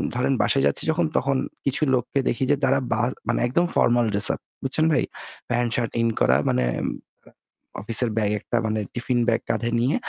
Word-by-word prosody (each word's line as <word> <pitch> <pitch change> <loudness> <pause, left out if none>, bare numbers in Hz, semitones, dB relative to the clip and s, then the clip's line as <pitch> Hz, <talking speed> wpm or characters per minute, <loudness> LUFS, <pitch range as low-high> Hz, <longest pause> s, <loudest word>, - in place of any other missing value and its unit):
ধরেন 125 +2 +1
বাসায় 135 - +2
যাচ্ছি - - -1
যখন 165 +1 +1
তখন 135 0 +1 0.3
কিছু 140 +3 0
লোককে 125 +3 -1
দেখি 130 - -1
যে - - +5
তারা 135 +1 +3
বার 120 +2 +1 0.2
মানে 120 - +1
একদম 170 +8 +2
ফরমাল 120 0 +3
ড্রেস 100 - +4
আপ। - - -12 0.2
বুঝছেন 155 +4 0
ভাই? - - +2 0.5
প্যান্ট 120 0 +1
শার্ট 120 -2 -1
ইন 115 - +2
করা 65 +1 +4
মানে 65 0 +1 0.2
আ - - -4 1.0
অফিসের 115 +3 +1
ব্যাগ 105 -1 +1
একটা 120 - -2
মানে 110 0 -1
টিফিন 120 0 -1
ব্যাগ 115 - +2
কাঁধে 120 - 0
নিয়ে 125 +5 +1
120 Hz, 190 wpm, -24 LUFS, 115-135 Hz, 1.0 s, যে